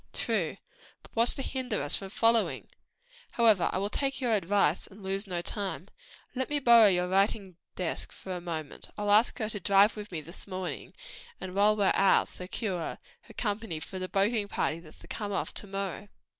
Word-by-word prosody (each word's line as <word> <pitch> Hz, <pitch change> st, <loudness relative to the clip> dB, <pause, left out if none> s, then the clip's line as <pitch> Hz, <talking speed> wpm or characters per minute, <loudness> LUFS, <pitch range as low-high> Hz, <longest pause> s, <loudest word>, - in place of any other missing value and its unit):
"True, -, -, -1 dB, 0.5 s
but -, -, -19 dB
what's 230 Hz, +1 st, +3 dB
to 270 Hz, -, -3 dB
hinder 260 Hz, -, -2 dB
us 145 Hz, -, -1 dB
from 195 Hz, -, -6 dB
following? 230 Hz, +2 st, +2 dB, 0.7 s
However, 220 Hz, -6 st, +4 dB
I -, -, -1 dB
will 200 Hz, +2 st, -1 dB
take 275 Hz, -1 st, -1 dB
your 250 Hz, -3 st, 0 dB
advice, 195 Hz, -4 st, +2 dB
and 200 Hz, +1 st, -14 dB
lose 195 Hz, +2 st, -2 dB
no 175 Hz, -2 st, -3 dB
time. 200 Hz, -1 st, -4 dB, 0.4 s
Let 260 Hz, 0 st, -2 dB
me 295 Hz, -, 0 dB
borrow 235 Hz, -5 st, +7 dB
your 180 Hz, -2 st, +2 dB
writing 195 Hz, -1 st, +1 dB, 0.2 s
desk 180 Hz, -3 st, -3 dB
for 190 Hz, -, -9 dB
a 175 Hz, -, -5 dB
moment. 160 Hz, -4 st, -6 dB
I'll 205 Hz, -1 st, 0 dB
ask 215 Hz, +4 st, +5 dB
her 215 Hz, -3 st, -2 dB
to 210 Hz, -, -3 dB
drive 200 Hz, +3 st, +5 dB
with 210 Hz, -1 st, -8 dB
me 170 Hz, -, -3 dB
this 170 Hz, +7 st, -10 dB
morning, 185 Hz, -2 st, -5 dB, 0.4 s
and 185 Hz, -, -6 dB
while 205 Hz, +2 st, +4 dB
we're 200 Hz, -2 st, +3 dB
out 195 Hz, -, +4 dB
secure 180 Hz, -1 st, -4 dB, 0.2 s
her -, -, -16 dB
company 205 Hz, -6 st, -2 dB
for 185 Hz, +4 st, -7 dB
the 185 Hz, 0 st, -4 dB
boating 205 Hz, +2 st, +1 dB
party 165 Hz, -4 st, -1 dB
that's 160 Hz, -2 st, -15 dB
to -, -, -15 dB
come 205 Hz, -2 st, -4 dB
off 195 Hz, -, -2 dB
to 205 Hz, -, -6 dB
morrow." 195 Hz, 0 st, -4 dB
200 Hz, 195 wpm, -29 LUFS, 185-215 Hz, 0.7 s, borrow